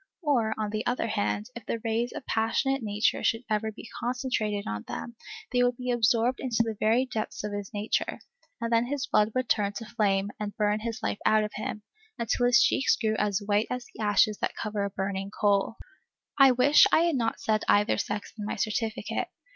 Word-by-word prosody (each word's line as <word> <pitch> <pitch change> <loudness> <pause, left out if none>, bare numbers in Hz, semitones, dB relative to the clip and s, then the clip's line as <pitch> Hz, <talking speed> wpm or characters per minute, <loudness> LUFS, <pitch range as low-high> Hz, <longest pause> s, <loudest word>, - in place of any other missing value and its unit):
Or, 235 -8 +1
on 215 -1 -2
the 215 +1 -2
other 245 -1 0
hand, 210 +1 -1
if 235 - -9
the - - -1
rays 230 +2 0
of - - -7
a - - -48
passionate 250 +5 0
nature 210 -1 0
should 225 +2 +1
ever 215 +1 0
be 225 - -11
concentrated 240 -5 -1
on 105 0 -3
them, 235 - -6 0.4
they 245 - +3
would 245 -1 +2
be 250 0 -2
absorbed 235 +1 +2
into 235 -3 +1
the 225 -1 -3
very 230 +4 +3
depths 220 -5 -4
of 210 -1 -4
his 205 -1 -5
nature, 210 0 -1 0.4
and 230 0 -2
then 230 +1 +3
his 275 0 -2
blood 210 -4 +2
would 255 -1 0
turn 205 -2 +1
to 225 - -6
flame 200 -2 0
and 210 -1 -5
burn 210 -1 +1
his 225 0 -5
life - - -1
out 215 0 +4
of 210 - -4
him, 210 0 -5 0.3
until 235 +1 +1
his 245 -1 +6
cheeks 270 - +3
grew 220 -1 0
as 205 -1 0
white 205 +1 +2
as 250 -1 -4
the - - -9
ashes 210 0 +3
that - - -2
cover 210 -2 -3
a 200 - -1
burning 195 0 -3
coal. 205 +1 +1 0.6
I 275 -1 +7
wish 260 +4 +6
I - - +5
had 340 -2 +2
not 230 -3 -1
said 215 -1 +1
either 205 +1 +3
sex 205 - -4
in - - -3
my 210 - -3
certificate. 220 +2 -2
220 Hz, 210 wpm, -28 LUFS, 210-240 Hz, 0.6 s, I